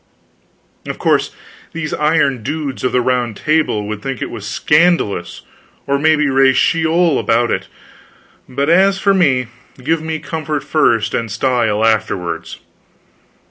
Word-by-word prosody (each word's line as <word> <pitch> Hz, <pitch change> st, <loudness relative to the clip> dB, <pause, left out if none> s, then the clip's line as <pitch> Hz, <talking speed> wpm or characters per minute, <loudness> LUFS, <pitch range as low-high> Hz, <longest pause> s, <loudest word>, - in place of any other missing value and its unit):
Of -, -, -5 dB
course -, -, +1 dB, 0.4 s
these 155 Hz, -2 st, -4 dB
iron 150 Hz, -5 st, +1 dB
dudes 145 Hz, +1 st, -4 dB
of 130 Hz, -, +1 dB
the 125 Hz, -, +2 dB
Round 120 Hz, -3 st, -1 dB
Table 155 Hz, -10 st, 0 dB
would 105 Hz, -1 st, -5 dB
think 135 Hz, -3 st, -4 dB
it -, -, -5 dB
was 105 Hz, -3 st, -7 dB
scandalous, 155 Hz, -, +1 dB, 0.4 s
and 140 Hz, 0 st, 0 dB
maybe 155 Hz, -1 st, +3 dB
raise 135 Hz, -1 st, +3 dB
Sheol 165 Hz, -1 st, +2 dB
about 120 Hz, +1 st, +1 dB
it, -, -, -2 dB, 0.8 s
but 140 Hz, +2 st, -2 dB
as 190 Hz, +4 st, +4 dB
for 195 Hz, 0 st, +2 dB
me, 140 Hz, -10 st, +2 dB, 0.4 s
give 160 Hz, +3 st, 0 dB
me 160 Hz, 0 st, -3 dB
comfort 155 Hz, -2 st, -4 dB
first, 120 Hz, -8 st, +1 dB
and 115 Hz, -1 st, -2 dB
style 115 Hz, -2 st, 0 dB
afterwards. 85 Hz, -7 st, -1 dB
140 Hz, 140 wpm, -16 LUFS, 115-160 Hz, 0.8 s, as